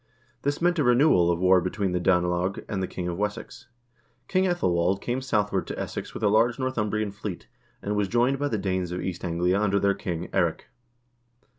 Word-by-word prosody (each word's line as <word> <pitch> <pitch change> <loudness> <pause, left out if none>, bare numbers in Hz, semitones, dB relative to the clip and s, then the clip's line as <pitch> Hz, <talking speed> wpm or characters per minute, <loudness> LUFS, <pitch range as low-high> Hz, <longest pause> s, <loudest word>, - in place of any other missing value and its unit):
This 145 +3 -2
meant 175 -1 +2
a - - +3
renewal 125 - +4
of 85 - +2
war 90 +1 +4
between 95 +1 -2
the 90 - 0
Danelag 90 +1 +1
and 95 -2 -3
the 95 - -1
king 90 - -5
of 85 +1 -4
Wessex. 105 0 -4 0.6
King 185 0 +2
^Ethelwald 95 - +1
came 125 +4 -2
southward 105 -7 0
to - - -5
Essex - - -5
with - - -6
a - - +4
large 115 +3 +3
Northumbrian 110 -5 -1
fleet, 100 -2 -7 0.4
and 105 +1 -1
was 105 -1 +1
joined 120 +5 +1
by 145 - 0
the 115 - -1
Danes 95 -3 -2
of 90 - -3
East 90 -2 -4
Anglia 90 +2 +1
under 100 -1 +2
their 100 0 +2
king, 85 -2 -4
Eirik. - - 0
100 Hz, 195 wpm, -26 LUFS, 90-120 Hz, 0.6 s, renewal